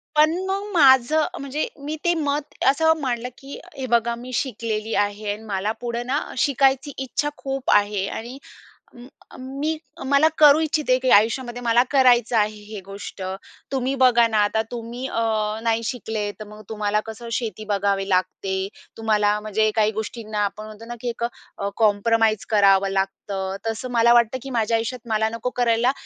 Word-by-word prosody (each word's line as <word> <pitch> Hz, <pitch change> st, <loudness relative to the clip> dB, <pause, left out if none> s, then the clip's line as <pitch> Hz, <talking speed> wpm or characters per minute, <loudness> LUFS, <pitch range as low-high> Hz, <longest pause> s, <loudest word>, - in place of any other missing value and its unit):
पण 305 Hz, +1 st, +5 dB
मग 390 Hz, +1 st, -1 dB
माझं 280 Hz, 0 st, +5 dB
म्हणजे 280 Hz, +2 st, -3 dB, 0.2 s
मी 305 Hz, -, -3 dB
ते 345 Hz, -, +4 dB
मत 295 Hz, -2 st, -2 dB, 0.2 s
असं 320 Hz, +3 st, +3 dB
मांडलं, 250 Hz, -2 st, -2 dB
की 275 Hz, +1 st, -10 dB, 0.2 s
"हे 265 Hz, -, -3 dB
बघा, 235 Hz, 0 st, +1 dB
मी 245 Hz, +2 st, -9 dB
शिकलेली 225 Hz, -3 st, -2 dB
आहे 205 Hz, 0 st, -1 dB
आणि 215 Hz, +2 st, -10 dB
मला 200 Hz, 0 st, -1 dB
पुढं 240 Hz, 0 st, -3 dB
ना 275 Hz, +3 st, +1 dB, 0.2 s
शिकायची 275 Hz, +1 st, +2 dB
इच्छा 270 Hz, +3 st, -2 dB
खूप 270 Hz, -1 st, -2 dB
आहे 205 Hz, -1 st, +1 dB
आणि 240 Hz, +6 st, -6 dB, 0.6 s
अ, 240 Hz, -, -15 dB, 0.3 s
अ, -, -, -12 dB
मी 280 Hz, +5 st, -3 dB, 0.3 s
मला 280 Hz, +3 st, +5 dB
करू 300 Hz, 0 st, +7 dB
इच्छिते, 300 Hz, -5 st, +1 dB
की 255 Hz, -1 st, 0 dB
आयुष्यामध्ये 240 Hz, +3 st, +2 dB
मला 235 Hz, 0 st, +4 dB
करायचं 245 Hz, -4 st, +4 dB
आहे 210 Hz, 0 st, +1 dB
हे 210 Hz, -1 st, -8 dB
गोष्ट. 195 Hz, -1 st, -8 dB, 0.5 s
तुम्ही 265 Hz, 0 st, 0 dB
बघा 240 Hz, -2 st, +6 dB
ना, 220 Hz, -1 st, 0 dB
आता 220 Hz, +2 st, 0 dB
तुम्ही 240 Hz, +2 st, -5 dB
अ, 230 Hz, -, -2 dB, 0.4 s
नाही 230 Hz, 0 st, +1 dB
शिकले 220 Hz, -3 st, -3 dB
तर -, -, -5 dB
मग 210 Hz, 0 st, -12 dB
तुम्हाला 210 Hz, -1 st, 0 dB
कसं 225 Hz, +2 st, -8 dB
शेती 225 Hz, -2 st, -3 dB
बघावी 200 Hz, -1 st, 0 dB
लागते. 190 Hz, +1 st, -1 dB, 0.3 s
तुम्हाला 210 Hz, -2 st, +1 dB
म्हणजे 215 Hz, 0 st, +1 dB
काही 215 Hz, -1 st, +3 dB
गोष्टींना 215 Hz, 0 st, -4 dB
आपण 215 Hz, +2 st, -4 dB
म्हणतो 215 Hz, +1 st, -11 dB
ना 240 Hz, -, -6 dB
की 245 Hz, -, -3 dB
एक 235 Hz, 0 st, -3 dB
अ, 200 Hz, -4 st, -6 dB
कॉम्प्रोमाईज 220 Hz, 0 st, +2 dB
करावं 195 Hz, -2 st, +4 dB
लागतं. 195 Hz, 0 st, -1 dB, 0.5 s
तसं 225 Hz, +3 st, -3 dB
मला 235 Hz, 0 st, +5 dB
वाटतं, 235 Hz, +1 st, +3 dB
की 270 Hz, -, -7 dB
माझ्या 230 Hz, -2 st, +1 dB
आयुष्यात 230 Hz, +2 st, -3 dB
मला 220 Hz, 0 st, +1 dB
नको 230 Hz, +2 st, -3 dB
करायला 240 Hz, +1 st, +2 dB
230 Hz, 170 wpm, -23 LUFS, 215-260 Hz, 0.6 s, करू